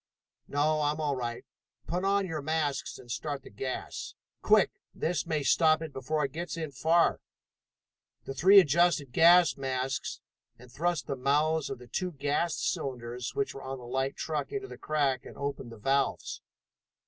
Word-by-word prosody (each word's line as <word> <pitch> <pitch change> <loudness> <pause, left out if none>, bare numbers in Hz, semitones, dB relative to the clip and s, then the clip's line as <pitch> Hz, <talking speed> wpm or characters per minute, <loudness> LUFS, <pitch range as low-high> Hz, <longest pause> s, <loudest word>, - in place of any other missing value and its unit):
"No, 155 +2 +1
I'm 150 +1 0
all 150 -3 0
right. 120 -2 -4 0.4
Put 175 +3 -2
on 200 0 +2
your 160 -4 -4
masks 150 -1 -1
and 120 - -11
start 145 +1 -3
the - - -13
gas! 130 +5 -5 0.3
Quick! - - +4 0.2
That 165 -1 -1
may 155 -3 0
stop 155 +1 +4
it 155 -3 -7
before 150 +3 -1
it 135 - -5
gets 170 +2 -5
in 160 -3 -4
far!" 165 +5 +2 1.0
The 135 - -5
three 195 +7 +8
adjusted 165 -4 +3
gas 170 +5 +6
masks 130 -1 -2 0.4
and 125 0 -16
thrust 165 -1 -1
the 135 - -3
mouths 145 +3 +1
of 125 - -6
two 180 -2 -2
gas 145 +4 0
cylinders 125 -2 -3
which 210 - -1
were 135 - -8
on 135 0 -5
the 125 - -11
light 135 +2 -1
truck 155 - -3
into 405 -1 -4
the - - -10
crack, 140 -4 0
and - - -11
opened 140 -4 -4
the 115 - -10
valves. 135 +5 0
145 Hz, 170 wpm, -29 LUFS, 135-165 Hz, 1.0 s, three